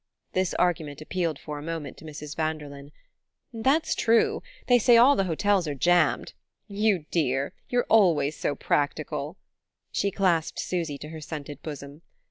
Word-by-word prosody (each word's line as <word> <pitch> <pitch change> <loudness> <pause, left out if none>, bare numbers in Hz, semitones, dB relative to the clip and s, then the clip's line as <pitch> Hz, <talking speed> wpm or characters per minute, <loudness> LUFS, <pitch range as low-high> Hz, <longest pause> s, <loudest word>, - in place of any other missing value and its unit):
This 185 -1 0
argument 160 -5 0
appealed 165 -1 -2
for 150 0 -7
a - - -8
moment 165 -1 -5
to - - -13
Mrs. 150 -1 -8
Vanderlyn. 150 -3 -4 0.6
"That's 270 +8 +1
true; 230 0 +2 0.2
they 245 -1 +5
say 240 +1 +6
all 260 +5 +7
the 195 - +1
hotels 185 +1 +1
are 145 - -3
jammed. 175 +2 +2 0.3
You 200 -5 +1
dear, 140 -4 0 0.2
you're 245 -1 +1
always 170 -9 +4
so 145 - -2
practical!" 150 +3 -1 0.5
She 200 - 0
clasped 180 -5 +1
Susy 165 -5 -2
to 150 - -9
her 160 0 -8
scented 145 -2 -7
bosom. 145 0 -8
160 Hz, 150 wpm, -26 LUFS, 145-195 Hz, 0.6 s, all